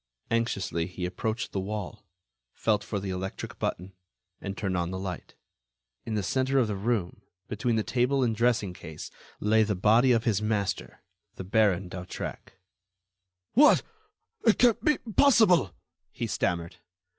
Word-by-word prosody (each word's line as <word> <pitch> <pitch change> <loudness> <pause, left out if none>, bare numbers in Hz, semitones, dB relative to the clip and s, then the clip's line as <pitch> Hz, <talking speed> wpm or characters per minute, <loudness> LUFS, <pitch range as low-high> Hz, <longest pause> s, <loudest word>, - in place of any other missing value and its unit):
Anxiously, 100 -7 0
he 90 0 -5
approached 110 +6 -3
the 95 - -2
wall, 100 0 -5 0.5
felt 110 -2 0
for 105 - -3
the 95 -1 -4
electric 95 +1 -5
button, 90 +2 -3 0.5
and 100 0 -5
turned 95 -3 -2
on 85 -1 -1
the 95 - -4
light. 95 -2 -6 0.7
In 110 - -2
the 105 - -1
centre 130 +5 +1
of 130 - +4
the 105 - -2
room, 100 -3 -2 0.3
between 115 +2 -1
the 110 - +1
table 130 +4 +1
and 115 -3 +1
dressing 110 -5 +1
case, 80 -3 -9 0.3
lay 110 +1 +3
the 105 -1 +1
body 110 +7 +4
of 115 -2 +3
his 110 -4 +1
master, 105 -3 -2 0.3
the - - -6
Baron 95 -1 +2
d'Hautrec. 90 0 -7 1.0
"What!... 295 +5 +6 0.6
It 225 - +4
can't 240 -3 +4
be 300 -1 +3 0.2
possible!" 215 - +5 0.4
he 120 - -4
stammered. 85 -5 -2
105 Hz, 150 wpm, -28 LUFS, 95-120 Hz, 1.0 s, What